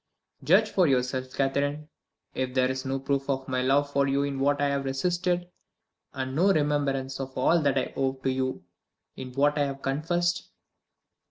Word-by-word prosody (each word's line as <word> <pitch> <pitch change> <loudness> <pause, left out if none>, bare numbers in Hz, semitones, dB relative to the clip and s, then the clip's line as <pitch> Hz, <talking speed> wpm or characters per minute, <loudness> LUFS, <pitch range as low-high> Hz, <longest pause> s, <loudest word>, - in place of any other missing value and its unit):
"Judge 210 +6 +4
for 185 -3 +3
yourself, 130 -1 0
Catherine, 145 +3 -1 0.5
if 130 0 -3
there 130 0 +3
is 130 +1 -5
no 135 0 -1
proof 135 +1 -2
of 135 -1 -1
my 130 -1 0
love 140 +2 +2
for 140 0 +2
you 140 +1 +1
in 140 -1 -3
what 145 +1 +2
I 145 0 +2
have 140 0 -1
resisted 175 +6 -1 0.6
and 130 0 -4
no 185 +6 +4
remembrance 140 -4 0
of 135 -1 -6
all 165 +6 +3
that 140 -2 +1
I 130 - -1
owe 135 -1 0
to 130 0 -2
you 130 -4 -2 0.5
in 130 -1 -7
what 145 +3 +2
I 145 - +3
have 135 0 -6
confessed." 175 +6 -1
140 Hz, 180 wpm, -27 LUFS, 130-145 Hz, 0.6 s, Judge